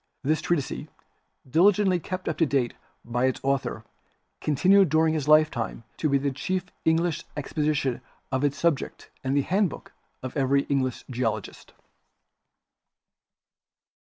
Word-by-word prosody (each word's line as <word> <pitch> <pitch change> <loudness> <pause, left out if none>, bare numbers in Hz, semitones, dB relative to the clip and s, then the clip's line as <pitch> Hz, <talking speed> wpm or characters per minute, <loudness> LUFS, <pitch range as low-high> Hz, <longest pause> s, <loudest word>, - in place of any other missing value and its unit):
This 155 +3 +1
treatise, 160 -6 -2 0.6
diligently 185 +5 +4
kept 185 +2 -5
up - - 0
to 165 - +5
date 135 -4 0 0.3
by 120 +2 0
its 130 - 0
author, 135 -5 -1 0.5
continued 185 +6 +4
during 160 +1 +3
his 150 -3 -2
lifetime 155 -8 +3
to 155 - 0
be 140 - +4
the 140 0 -1
chief 185 +7 -2 0.2
Eng 160 0 +5
lish 170 -1 -1
exposition 145 -3 -1 0.3
of 130 +1 0
its 145 -1 +1
subject 170 -5 -1
and 135 +1 0
the 140 - +3
handbook 190 0 -1 0.3
of 130 - -6
every 140 0 +2
English 130 -3 -1
geologist. 120 -3 -3
145 Hz, 130 wpm, -26 LUFS, 130-165 Hz, 0.6 s, to